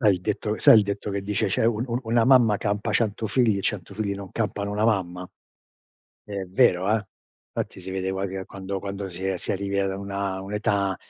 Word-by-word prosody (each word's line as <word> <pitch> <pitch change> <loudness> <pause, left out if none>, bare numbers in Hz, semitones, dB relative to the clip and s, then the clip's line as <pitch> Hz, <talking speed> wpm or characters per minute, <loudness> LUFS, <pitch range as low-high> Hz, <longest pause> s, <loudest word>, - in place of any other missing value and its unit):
Sai 105 -5 +5
il 90 - -5
detto 105 +2 -2
sai - - +8
il - - +4
detto 100 +1 -3
che 100 0 -2
dice 105 +1 0
cioè: 110 +3 +1
"Un 115 0 +1
un 120 0 -2
una 115 0 +2
mamma 120 -5 +5
campa 105 0 -1
100 110 -1 0
figli 110 -2 +2
e - - -4
100 100 -1 -3
non 100 -2 -3
campano 105 -2 -2
una 105 +1 0
mamma". 90 -5 0 1.0
È 100 -2 -5
vero, 95 -1 +3
eh! 110 -1 +1 0.5
Infatti - - -3
si 95 +1 -7
vede 95 0 -2
qua 95 +1 -2
che 95 0 -5
quando 100 0 -5
quando 100 0 -5
si 95 +1 -6
è 95 -1 0
si - - -3
arrivi 100 0 -1
a 95 -1 -1
una 100 -1 -3
un'età 100 -1 0
100 Hz, 210 wpm, -25 LUFS, 95-105 Hz, 1.0 s, sai